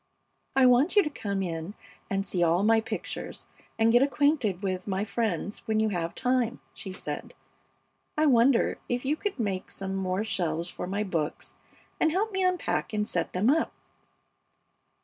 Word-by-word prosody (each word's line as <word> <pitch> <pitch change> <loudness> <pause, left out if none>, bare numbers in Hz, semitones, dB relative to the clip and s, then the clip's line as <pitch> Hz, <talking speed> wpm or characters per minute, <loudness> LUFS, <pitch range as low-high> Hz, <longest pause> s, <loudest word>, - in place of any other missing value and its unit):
"I 265 -1 +6
want 255 - +5
you 410 - +7
to 300 - -3
come 200 -7 -2
in 170 +2 -4 0.3
and 195 -2 -1
see 180 -2 -1
all 170 +2 +3
my 225 +1 +4
pictures - - -5 0.3
and 225 0 +4
get 240 +1 +6
acquainted 270 - +2
with 185 -1 -2
my 195 +1 -1
friends 210 -3 -2
when 220 -1 +2
you 220 0 +2
have 170 -4 -2
time," 250 -2 +1
she 190 - -7
said. 185 - -6 0.8
"I 310 - +4
wonder 245 -2 +4
if 245 +1 -1
you 290 +3 +2
could 405 +2 -3
make 195 -4 -2
some 195 0 -4
more 190 +1 -1
shelves 170 -5 -1
for - - -5
my 200 +3 -1
books 165 -7 -3 0.5
and 320 - +3
help 415 +6 0
me 380 -1 0
unpack 365 -9 0
and 210 0 0
set - - -1
them 210 +8 +3
up?" 320 +2 +1
215 Hz, 170 wpm, -28 LUFS, 190-260 Hz, 0.8 s, you